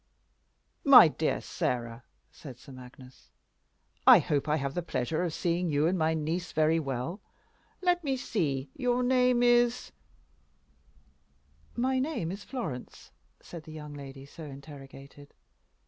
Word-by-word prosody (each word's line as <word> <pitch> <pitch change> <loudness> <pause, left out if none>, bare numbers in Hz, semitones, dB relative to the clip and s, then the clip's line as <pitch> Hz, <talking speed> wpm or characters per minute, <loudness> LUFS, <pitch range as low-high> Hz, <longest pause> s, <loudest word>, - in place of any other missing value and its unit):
"My - - +9
dear - - -2
Sarah," 120 -1 -3 0.3
said 135 -5 -11
Sir 140 - -15
Magnus, 130 0 -14 0.8
"I - - +11
hope 145 0 -1
I 150 - +3
have 140 -3 -3
the 175 - -2
pleasure 160 -1 -2
of 175 - -1
seeing 170 +2 -1
you 145 0 +1
and 175 +3 +1
my 160 -2 +1
niece 165 +3 -3
very 155 +1 +2
well. 135 - -4 0.6
Let 355 -1 +2
me 270 -3 -1
see, 140 - -2
your 250 0 0
name 250 -1 +3
is 240 0 +2 0.9
" 70 +2 -35
"My 260 0 +1
name 260 - -2
is 200 +2 -7
Florence," 175 - -7 0.3
said 170 - -10
the 155 - -10
young 150 -1 -9
lady 135 -1 -10
so 160 +3 -12
interrogated. 140 0 -12
155 Hz, 140 wpm, -29 LUFS, 135-185 Hz, 0.9 s, I